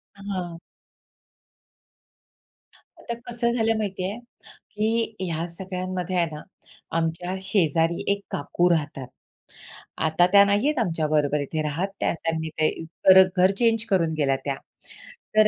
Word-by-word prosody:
हां. 185 -4 -5 2.4
आता 235 - -5
कसं 235 0 -1
झालं 225 -2 +1
माहिती 195 -3 -3
आहे, 210 - -5 0.4
की 225 +1 -2
ह्या 170 -2 -2
सगळ्यांमध्ये 185 0 -4
आहे 175 -1 +3
ना, 150 - -8 0.6
आमच्या 170 +3 -2
शेजारी 165 -3 +1
एक 200 - -2
काकू 175 +5 0
राहतात. 145 -5 -1 0.9
आता 160 +2 +3
त्या 200 0 +8
नाही 205 +6 +2
आहे 300 -2 +1
आमच्या 165 -6 0
बरोबर 150 -1 +1
इथे 155 +2 -3
राहत, 155 +6 -1
त्या - - +1
त्यांनी 160 -1 -3
ते 155 - +4 0.7
घर 185 +1 +5
चेंज 230 -1 +2
करून 170 -5 +2
गेल्या 135 -3 +2
त्या. 140 -1 -1 0.8
तर 215 0 +7
180 Hz, 130 wpm, -24 LUFS, 160-205 Hz, 2.4 s, त्या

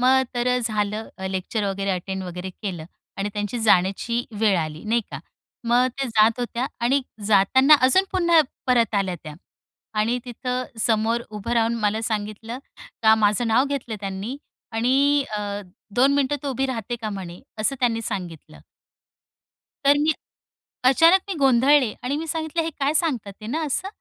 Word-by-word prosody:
मग 260 +1 +4
तर 240 0 -1
अ, 250 0 +3
झालं 215 -2 -2 0.2
लेक्चर 190 +3 -2
वगैरे 195 0 -1
अटेंड 190 +1 -3
वगैरे 180 +1 -6
केलं 180 -4 -6 0.3
आणि 200 +1 -1
त्यांची 210 +3 -3
जाण्याची 215 +4 +2 0.2
वेळ 205 -4 +4
आली, 155 -1 -4
नाही 230 +2 +2
का. - - -5 0.5
मग 245 +2 +4
त्या 270 - 0
जात 225 +2 +3
होत्या 245 +1 -2 0.2
आणि 270 +4 +3 0.3
जाताना 240 +8 +6
अजून 320 +10 +5
पुन्हा 340 -3 +4 0.3
परत 235 -3 +2
आल्या 195 -3 0
त्या 150 -1 -8 0.7
आणि 235 +3 +1
तिथं 250 +1 -3 0.2
समोर 230 +1 +1
उभं 210 +2 -5
राहून 230 0 +2
मला 210 +1 +1
सांगितलं 220 +2 -4 0.4
का, 220 0 +7
माझं 215 +2 +2
नाव 225 +4 +3
घेतलं 275 -6 -4
त्यांनी 195 +6 -4 0.4
आणि 275 +5 +3
अ, - - -2 0.5
"दोन 270 +3 +4
मिनिटं 285 0 +1
तू 285 - -3
उभी 265 +1 -1
राहते 240 -2 -3
का?" 220 -2 -5
म्हणे 180 -3 -7 0.2
असं 275 +6 0
त्यांनी 230 -2 +1
सांगितलं. 175 -7 -6 1.3
तर 285 +1 +5
मी 310 +1 +3 0.7
अचानक 330 +8 +6
मी - - 0
गोंधळले 265 -2 +4
आणि 270 +3 -1
मी 325 +1 -4
सांगीतलं, 320 +1 -2
हे 325 - -2
काय 280 +2 +1
सांगतात 255 - 0
आहे 215 - -7
ना 320 +3 -1
असं? 325 +7 -2
235 Hz, 160 wpm, -23 LUFS, 205-265 Hz, 1.3 s, का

